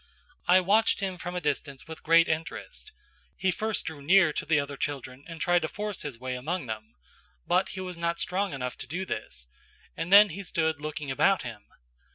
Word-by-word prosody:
I 185 +1 +6
watched 210 +5 +3
him 190 -3 -3
from 175 +1 -5
a - - 0
distance 145 -3 -2
with 160 0 -8
great 165 +1 +5
interest; 165 - -4 0.5
he 190 - +2
first 220 +4 -1
drew 160 -3 -6
near 175 +1 +5
to - - -3
the 155 -2 +4
other 140 0 -3
children 135 -3 -4
and 165 -2 -8
tried 175 +1 +3
to - - -1
force 210 -2 -4
his 145 -6 -5
way 130 +2 -4
among 150 +6 -3
them, 110 - -7 0.5
but 185 +2 +2
he 190 - -5
was 180 -2 -6
not 170 0 0
strong 190 +3 -1
enough 125 -2 -4
to - - -3
do 180 +5 -3
this, 60 - -4 0.5
and 165 +2 -4
he 200 -3 +8
then - - -5
stood 160 -4 0
looking 150 -2 -4
about 190 +8 +3
him. 115 -4 -8
165 Hz, 200 wpm, -28 LUFS, 140-185 Hz, 0.5 s, he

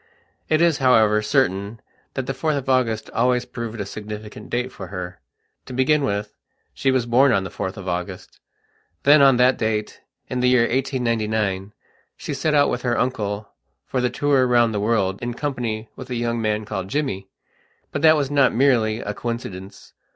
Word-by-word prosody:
It 155 +1 +3
is, 170 -4 +3
however, 110 -5 +4
certain 105 -3 0 0.4
that 130 - -2
the 135 - -2
4th 145 +3 -1
of 135 - -5
August 125 -4 +1
always 125 +1 +1
proved 115 -2 -6
a 100 - -2
significant 105 +1 -8
date 125 +1 -2
for 95 - -8
her. 90 -1 -7 0.5
To 130 - -7
begin 140 +4 +2
with, 105 -4 -2 0.4
she 135 - 0
was 130 -3 +2
born 130 +3 +4
on 100 -4 +2
the 95 - -6
4th 95 +3 -4
of 95 -1 -8
August. 90 0 -5 0.6
Then, 145 +1 +7
on 135 -2 +6
that 125 +1 +4
date, 110 -1 -2 0.3
in 125 - -3
the 125 0 +3
year 125 -2 +5
1899, 110 -6 -1 0.4
she - - -5
set 155 -1 0
out 145 -1 +4
with 125 - -2
her 120 -2 0
uncle 105 -4 -2 0.4
for 130 - -2
the 125 - +1
tour 135 0 +2
round 120 -2 +3
the 105 - -1
world 100 -3 0
in 120 0 -3
company 120 -7 -3
with 130 - -9
a 125 - -3
young 120 0 -1
man 105 -1 -1
called 95 -3 -4
Jimmy. 100 -7 -3 0.6
But 140 - -3
that 155 0 +6
was 145 -2 -1
not 140 -4 +3
merely 115 -4 +2
a 105 - -4
coincidence. 100 -5 -6
120 Hz, 185 wpm, -22 LUFS, 105-130 Hz, 0.6 s, Then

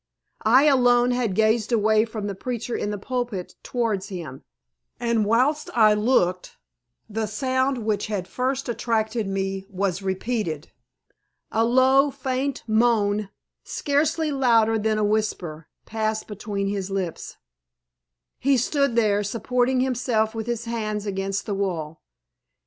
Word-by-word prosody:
I 255 +5 +6
alone 245 -4 +4
had 240 -6 0
gazed 220 +2 +2
away 220 -1 +3
from 220 -2 -6
the 205 - -2
preacher 240 +3 -4
in - - -2
the 205 - -3
pulpit 240 -4 -4
towards 220 -5 -2
him, 165 -9 -7 0.6
and 235 -3 +1
whilst 255 +8 +2
I 215 -2 +6
looked 210 -5 +1 0.5
the 220 +1 -2
sound 260 +2 -1
which 210 -2 0
had 200 -4 -3
first 260 +2 -2
attracted 225 -2 -1
me 195 0 -3
was 195 -1 -2
repeated. 190 -5 -3 0.8
A 225 - +2
low, 260 +4 +4
faint 265 0 -3
moan, 215 -3 +2 0.3
scarcely 305 +2 0
louder 230 -5 +3
than 215 0 0
a 215 - +1
whisper, 200 -7 -1 0.2
passed 220 0 -2
between 205 -1 -4
his 195 -1 -2
lips. 190 -4 -4 1.0
He 275 +1 +3
stood 280 +1 +1
there 210 -3 +2
supporting 245 +4 0
himself 240 -4 0
with 225 0 -5
his 235 -1 -2
hands 215 -3 -3
against 195 0 -2
the 205 - -2
wall. 170 -6 -3
220 Hz, 130 wpm, -24 LUFS, 200-245 Hz, 1.0 s, I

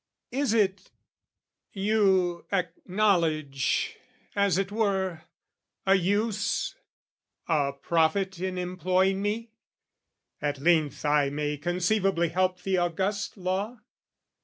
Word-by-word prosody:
Is 265 -3 +1
it, 200 -3 +1 0.8
you 190 -4 +2
acknowledge, 175 -7 0 0.4
as 200 -3 +2
it 195 0 -1
were, 190 -6 0 0.6
a 190 - +5
use, 205 +2 0 0.7
A 145 -4 +1
profit 170 +6 +1
in 185 0 -3
employing 185 +2 +1
me? 220 +3 -2 0.9
at 145 -1 -1
length 155 0 +2
I 145 -1 +3
may 150 +1 -2
conceivably 175 +2 +1
help 185 +1 0
the 190 -1 +1
august 190 +5 -1
law? 195 +6 -2
185 Hz, 95 wpm, -27 LUFS, 170-200 Hz, 0.9 s, a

